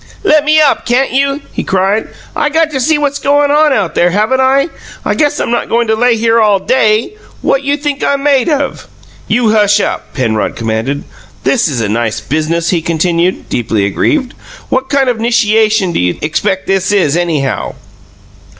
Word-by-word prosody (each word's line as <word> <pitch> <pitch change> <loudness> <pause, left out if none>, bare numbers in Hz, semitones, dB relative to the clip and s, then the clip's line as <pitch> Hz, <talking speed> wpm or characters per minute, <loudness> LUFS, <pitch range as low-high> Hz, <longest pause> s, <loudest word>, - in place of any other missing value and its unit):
"Let 305 -6 +3
me 310 +1 +4
up, 300 -3 +2
can't 255 +2 +1
you?" 275 +2 0
he - - -3
cried. 195 +3 0 0.3
"I 295 - 0
got 320 +1 +1
to 270 - -2
see 310 +4 +2
what's 285 -1 -1
goin' 285 +1 +2
on 300 0 +3
out 195 - 0
there, 175 - +2
haven't 215 +8 +1
I? 275 +4 +2 0.4
I - - +1
guess 295 -1 0
I'm - - -2
not 240 - -1
goin' 235 +1 +1
to 220 -1 +1
lay 240 +1 +2
here 230 +1 +2
all 210 -2 +3
DAY! 220 - +1 0.3
What 275 - +1
you 285 +1 -1
think 290 -1 -3
I'm 280 0 0
made 280 -1 +2
of?" 285 -3 -2 0.4
"You 225 0 +2
hush 210 -1 +3
up!" - - -3
Penrod 115 -5 -1
commanded. 115 +5 -2 0.4
"This 250 - +2
is 130 -7 -2
a 110 - -1
nice 110 +1 -1
biznuss!" 155 +8 -1
he 175 -3 0
continued, 170 +2 -1
deeply 110 -4 -1
aggrieved. 260 - 0 0.4
"What 260 +1 -1
kind 275 -2 +1
of 245 -2 0
a - - -5
'nishiation 220 -4 +2
do - - -1
you 90 0 0
expect 190 +5 -1
this 195 0 0
is, 180 -8 +2
anyhow?" 160 -6 -2
220 Hz, 190 wpm, -12 LUFS, 170-275 Hz, 0.4 s, me